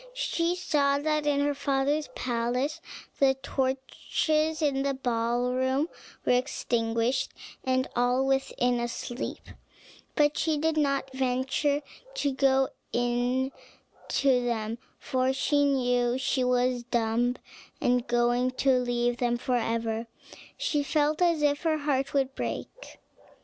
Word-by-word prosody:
She 345 -7 0
saw 290 -6 +2
that 305 0 0
in 285 -1 +2
her 290 0 +1
father's 280 +2 0
palace 250 +6 -1 0.4
the 270 -1 +4
torches 305 +4 0
in 280 -3 +1
the 275 0 0
ballroom 250 +4 0 0.4
were - - +3
extinguished, 240 -1 0 0.3
and 260 0 +1
all 245 +2 +2
within 255 -2 +1
asleep; 240 +1 -5 0.7
but 295 0 +3
she 315 -2 +1
did 320 +1 +1
not 275 -3 0
venture 265 +3 0 0.3
to 285 - 0
go 270 0 +3 0.2
in 245 +2 0 0.6
to 260 -3 +2
them, 230 -1 -2 0.2
for 255 0 -1
now 260 -3 +2
she 265 0 0
was 250 0 +2
dumb 240 0 0 0.4
and 245 0 +1
going 240 +1 +2
to 255 0 +2
leave 245 -1 0
them 240 -1 +1
forever, 230 -2 -1 0.5
she 295 - 0
felt 300 +2 +1
as 335 -4 +3
if 290 0 +2
her 320 -2 +1
heart 275 -2 0
would 270 -1 0
break. - - -6
260 Hz, 120 wpm, -28 LUFS, 245-285 Hz, 0.7 s, the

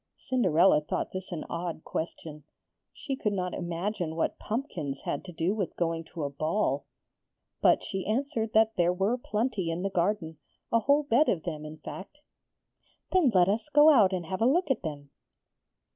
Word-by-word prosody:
Cinderella 185 -10 +3
thought 150 - -3
this 185 0 -6
an 165 -3 -4
odd 170 -1 -4
question. 160 -2 -5 0.5
She 275 - -5
could 210 -6 -1
not 180 -2 -2
imagine 175 0 -3
what 165 - -1
pumpkins 180 - -4
had 145 - -3
to 180 - -8
do 165 +3 0
with 200 -6 -3
going 165 -1 -1
to 160 -1 -6
a 140 - -1
ball. 145 -2 -1 0.7
But - - +4
she 190 -1 -4
answered 225 -1 -1
that 220 0 +4
there 175 0 +3
were 195 +6 +1
plenty 215 -6 -2
in 165 +2 -2
the 195 - -1
garden 170 -4 -1 0.3
a 230 - +4
whole 285 +6 +3
bed 285 +2 +3
of 165 -4 0
them 155 -3 -5
in 155 +1 -8
fact. 190 - -9 0.9
'Then 365 -7 +4
let 180 -1 +6
us 220 +8 -1
go 295 +2 +7
out 215 -9 +5
and 180 -3 -2
have 185 +4 -4
a 230 - +5
look 320 +3 +2
at 260 - 0
them.' 145 -4 -6
185 Hz, 180 wpm, -28 LUFS, 165-225 Hz, 0.9 s, go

